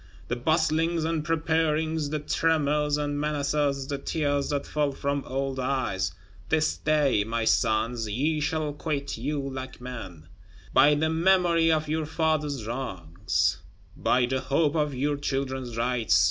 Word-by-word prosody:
The 120 - 0
bustlings 160 +4 +1
and 160 -1 -1
preparings, 160 -1 0
the 155 - -1
tremors 150 -1 +1
and 145 -1 -2
menaces; 145 -2 0
the 140 0 -4
tears 145 -1 -1
that 145 -1 -1
fell 150 -2 0
from 140 0 -2
old 135 0 -2
eyes! 125 -8 -1 0.4
This 155 -1 +2
day, 150 -8 +2
my 115 +1 -2
sons, 110 +1 +1
ye 150 +9 0
shall 150 0 -1
quit 145 -4 -3
you 145 +5 -2
like 130 -1 -6
men. 95 -11 -8 0.5
By 145 +3 +6
the 160 +2 +1
memory 170 -1 +3
of 155 -1 +1
your 155 0 -1
fathers' 150 -6 0
wrongs; 100 -7 -1 0.4
by 125 0 +2
the 130 +2 -1
hope 145 +2 +1
of 150 -3 0
your 145 +3 0
children's 130 -4 -3
rights! 120 -1 +2
145 Hz, 145 wpm, -27 LUFS, 130-155 Hz, 0.5 s, By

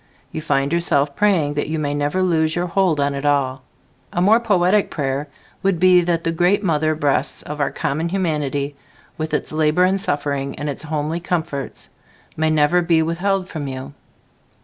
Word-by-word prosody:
You 160 - -4
find 140 -1 0
yourself 145 -4 +1
praying 180 -9 +2
that 145 0 -2
you 160 - -1
may 145 -2 -1
never 145 +6 0
lose 160 -3 +1
your 175 0 0
hold 180 -3 +1
on 140 0 +1
it 140 0 -4
all. 135 -3 +1 0.5
A - - -2
more 210 +6 +5
poetic 200 -3 +2
prayer 140 0 -2 0.3
would 190 -3 +1
be 180 0 +6
that 170 -1 0
the 165 - 0
great 180 +5 +2
mother 155 -3 +1
breasts 145 -2 -1
of 150 0 -7
our 140 - +1
common 160 +4 -2
humanity, 150 -6 -1 0.4
with 155 0 -3
its - - -2
labor 155 +3 +2
and 190 +1 +2
suffering 140 -6 -2
and 145 - -4
its 145 - -4
homely 155 +1 -2
comforts, 165 -5 -4 0.5
may 160 0 +1
never 155 +3 +3
be 165 -2 +3
withheld 185 +3 -1
from 150 -5 -5
you. 135 +1 -6
155 Hz, 180 wpm, -20 LUFS, 145-175 Hz, 0.5 s, be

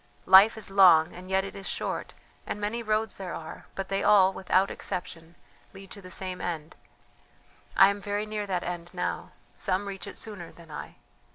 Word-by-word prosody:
Life 195 +4 +8
is 215 -2 -3
long 175 -5 +6
and 185 +1 -11
yet 190 0 +2
it 195 - -7
is 195 -1 -7
short, - - -4 0.3
and - - -4
many 210 +3 -2
roads 215 0 -1
there 190 -2 -5
are, 160 -1 -9
but 195 0 -4
they 195 0 0
all, 195 -2 +5
without 190 +1 +1
exception, 170 -2 -6 0.4
lead 195 0 -12
to 200 - -8
the 185 - -11
same 185 0 -3
end. 165 -2 -4 1.0
I 195 - +8
am 200 0 -3
very 205 +1 -2
near 210 -1 -4
that 180 -2 -1
end 175 -1 -5
now; 180 - -3 0.3
some 195 +1 -1
reach 195 -2 -6
it - - -9
sooner 205 -6 -7
than 165 -2 -16
I. 150 - -8
190 Hz, 190 wpm, -28 LUFS, 180-205 Hz, 1.0 s, Life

